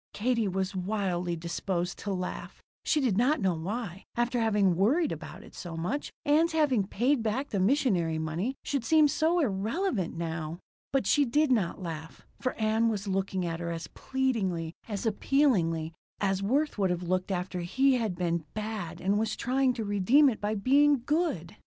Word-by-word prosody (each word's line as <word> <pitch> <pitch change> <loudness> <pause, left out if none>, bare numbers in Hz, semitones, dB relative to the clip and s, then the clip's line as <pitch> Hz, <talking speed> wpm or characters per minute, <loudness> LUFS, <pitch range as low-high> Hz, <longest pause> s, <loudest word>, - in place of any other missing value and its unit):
Katie 230 0 +1
was 190 +1 -2
wildly 180 -3 -1
disposed 175 +2 -3
to 200 - -4
laugh. 185 -1 -5 0.2
She 305 - +2
did 235 -8 +1
not 275 +6 +3
know 190 -3 +2
why, 190 +3 -4
after 240 +1 +1
having 205 -5 +3
worried 265 - +2
about - - -7
it - - -15
so 170 -2 -7
much, 180 - -3
Ann's 320 +3 +3
having 270 -11 +2
paid 245 +6 +1
back 230 +6 -1
the 200 - -1
missionary 190 - +2
money 165 +11 -2
should 280 -4 -1
seem 310 +4 +5
so 320 +4 +1
irrelevant 220 - -1
now. 165 -1 -4 0.3
But 270 -1 +1
she 290 - +4
did 290 +3 +2
not 195 -5 0
laugh, 160 -2 -7
for 255 - -1
Ann 220 +1 +2
was 205 -2 -3
looking 190 -1 -1
at 165 -1 -3
her 170 0 -3
as 165 0 -4
pleadingly, 195 -12 -1
as 210 0 -4
appealingly, 200 - +1 0.3
as 195 -1 0
Worth 270 +5 0
would 190 -2 +2
have 180 0 -1
looked 185 +2 -1
after 180 -1 -2
he 265 +11 +2
had 220 -6 -1
been 170 -2 -1
"bad" 210 -6 -4
and 200 +3 +1
was 220 - -1
trying 260 +1 +1
to 235 -2 -4
redeem 205 +9 +4
it 225 - -4
by 210 +1 -1
being 275 +4 +4
"good." 295 - -1
205 Hz, 175 wpm, -29 LUFS, 180-260 Hz, 0.3 s, seem